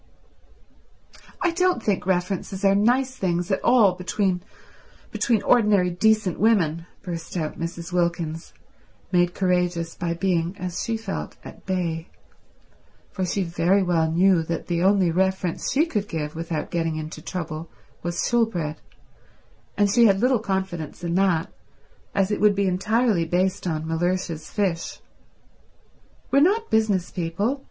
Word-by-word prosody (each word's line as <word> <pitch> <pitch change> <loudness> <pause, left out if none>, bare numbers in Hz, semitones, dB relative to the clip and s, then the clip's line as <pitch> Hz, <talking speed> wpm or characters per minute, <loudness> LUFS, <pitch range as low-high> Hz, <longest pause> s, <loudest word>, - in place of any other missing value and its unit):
"I 350 - +3
don't 360 -5 +1
think 195 -3 0
references 190 +1 -1
are 195 - +5
nice 250 +6 +2
things 180 -4 -1
at 190 - 0
all 230 -6 +5
between—between 190 +4 -3
ordinary 210 -7 +4
decent 215 +1 +2
women," 175 -7 +2 0.2
burst 170 0 -5
out 155 -2 -3
Mrs. 170 +1 -5
Wilkins, 170 -2 -1 0.6
made 175 -1 +2
courageous 180 -3 0
by 170 -1 -3
being, 175 0 0
as 180 0 -4
she 230 -1 -1
felt, 220 -3 -5
at - - -12
bay; 170 -3 -2 1.0
for 185 -2 -2
she 195 +2 0
very 175 +3 +2
well 165 -3 +1
knew 180 +1 +4
that 165 0 -4
the 170 -1 -1
only 190 -2 +3
reference 190 0 0
she 295 +5 +3
could 210 -11 -2
give 150 -4 -4
without 165 -2 -4
getting 165 -2 -1
into 155 0 -6
trouble 165 -2 -5 0.3
was 175 0 -2
Shoolbred, 190 -11 0 1.0
and 205 - +4
she 230 +3 +5
had 195 -1 +3
little 250 +1 +3
confidence 190 -6 -3
in 170 -1 -1
that, 180 -3 +1 0.6
as 195 0 +2
it 210 - -1
would 210 -1 +5
be 200 0 +1
entirely 195 0 +1
based 180 +2 0
on 160 -2 -2
Mellersh's 165 -1 -2
fish. 185 -5 -2 1.3
"We're 275 - +5
not 415 +9 +2
business 215 -5 +1
people. 195 +10 -1
180 Hz, 140 wpm, -24 LUFS, 170-205 Hz, 1.3 s, are